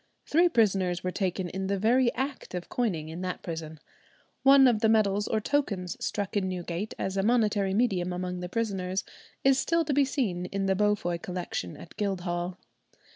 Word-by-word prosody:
Three 345 +3 +4
prisoners 195 - +2
were 185 - -1
taken 185 -1 -1
in 190 +1 -3
the 200 0 0
very 235 +4 +3
act 270 -7 -4
of 175 -1 -5
coining 175 -11 -1
in 165 +3 -6
that 185 -1 -4
prison. 160 -2 -6 0.6
One 275 0 +7
of 235 -4 +3
the 220 0 +3
medals 205 -2 +2
or 220 - +1
tokens 205 -8 -1
struck 205 -1 -2
in 190 -2 +1
Newgate 180 +2 -4
as 190 0 -2
a - - +3
monetary 210 -3 +2
medium 195 -6 +1
among 180 0 -3
the 180 0 -5
prisoners 190 -4 -1 0.4
is 270 0 +5
still 335 +2 +1
to 295 - 0
be 285 +1 +4
seen 210 - -1
in 195 0 -2
the 195 - +3
Beaufoy 205 -4 +1
Collection 175 - -4
at 165 - -12
Guildhall. 180 -3 -2
195 Hz, 180 wpm, -28 LUFS, 180-230 Hz, 0.6 s, One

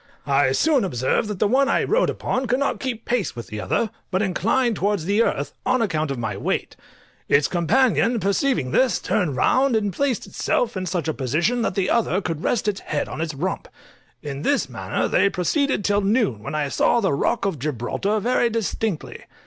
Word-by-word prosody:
I 140 -1 +3
soon 290 - +3
observed 130 - 0
that 210 -2 -4
the 205 - +2
one 270 +5 +3
I - - +2
rode - - +2
upon 260 0 -2
could 245 +2 +2
not 280 +1 -1
keep 240 -4 -4
pace 235 - -1
with 120 -2 -6
the 105 0 -5
other, 225 - 0 0.2
but 190 +2 0
inclined 225 +5 +1
towards 200 -4 0
the 205 +4 +2
earth, 145 -10 -1
on 255 0 +2
account 155 -9 0
of 135 - -3
my 110 -4 -3
weight; 100 - -2 0.5
its 140 0 +4
companion 230 - +2
perceiving 200 - 0
this, 255 - +3
turned 170 -10 -1
round 260 - +3
and 205 -3 0
placed 275 -1 -1
itself 240 - -1
in 185 -1 -3
such 175 -2 -2
a 160 - 0
position 170 - 0
that - - -1
the 190 -2 0
other 220 -5 +2
could 165 -5 -4
rest 220 -3 0
its 205 -2 0
head 150 - -3
on 155 - -5
its 160 -3 -3
rump; 180 +6 -3 0.6
in 140 -1 -5
this 285 - +1
manner - - -2
they 200 - +3
proceeded 210 - 0
till 205 0 +2
noon, 200 - +1
when 120 - -5
I 150 -2 -1
saw 235 - +2
the 195 -9 +1
rock 140 - 0
of 190 -7 -1
Gibraltar 150 - -1
very 240 +2 +1
distinctly. 220 -4 -3
200 Hz, 200 wpm, -22 LUFS, 155-235 Hz, 0.6 s, its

